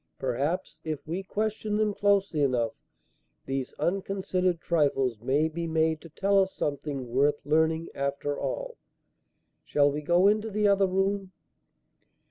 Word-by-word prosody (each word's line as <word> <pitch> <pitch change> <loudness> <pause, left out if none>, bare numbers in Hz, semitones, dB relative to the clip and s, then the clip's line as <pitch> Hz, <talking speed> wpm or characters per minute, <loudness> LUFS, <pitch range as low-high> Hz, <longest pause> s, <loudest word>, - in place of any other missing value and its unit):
Perhaps, 150 +6 -2
if 155 -2 -4
we 175 +4 -2
question 210 +1 -2
them 215 -1 +1
closely 200 -6 +2
enough, 125 -5 +1 0.7
these 135 -1 -3
unconsidered 185 -1 -1
trifles 135 -9 +1
may 140 +6 +2
be 165 +1 -4
made 160 -1 +1
to 165 - -12
tell 200 +5 +2
us 190 0 -1
something 140 -2 -3
worth 145 +3 +2
learning 160 +2 +2
after 140 +1 -2
all. - - -4 0.9
Shall 145 -1 +3
we 150 +2 -3
go 175 +5 +4
into 215 +2 +2
the 210 0 +1
other 200 -1 +4
room?" 195 0 -1
165 Hz, 135 wpm, -28 LUFS, 145-195 Hz, 0.9 s, go